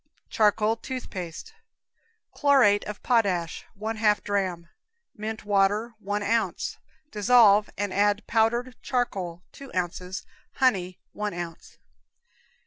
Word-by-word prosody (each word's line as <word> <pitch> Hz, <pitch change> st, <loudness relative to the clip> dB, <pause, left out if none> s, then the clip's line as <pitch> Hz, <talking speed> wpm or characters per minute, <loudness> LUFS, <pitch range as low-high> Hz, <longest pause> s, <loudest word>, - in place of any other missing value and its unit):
Charcoal 215 Hz, +1 st, +3 dB
Tooth 255 Hz, +2 st, -6 dB
Paste. 180 Hz, -, -7 dB, 0.8 s
Chlorate 265 Hz, -8 st, +4 dB
of 210 Hz, 0 st, -7 dB
potash, 195 Hz, -9 st, +1 dB
1/2 215 Hz, -1 st, +1 dB
dram; 185 Hz, -4 st, -2 dB, 0.5 s
mint 215 Hz, 0 st, -5 dB
water, 205 Hz, +3 st, +2 dB
1 205 Hz, 0 st, -2 dB
ounce. 225 Hz, +2 st, -1 dB, 0.3 s
Dissolve 210 Hz, -1 st, +5 dB
and 205 Hz, -1 st, -2 dB
add 205 Hz, +1 st, +2 dB
powdered 235 Hz, +3 st, +1 dB
charcoal, 190 Hz, -9 st, -2 dB
2 275 Hz, -1 st, -12 dB
ounces; 180 Hz, +1 st, -3 dB, 0.3 s
honey, 185 Hz, -9 st, +1 dB, 0.2 s
1 210 Hz, -2 st, -3 dB
ounce. 170 Hz, -2 st, -8 dB
210 Hz, 105 wpm, -26 LUFS, 190-225 Hz, 0.8 s, Dissolve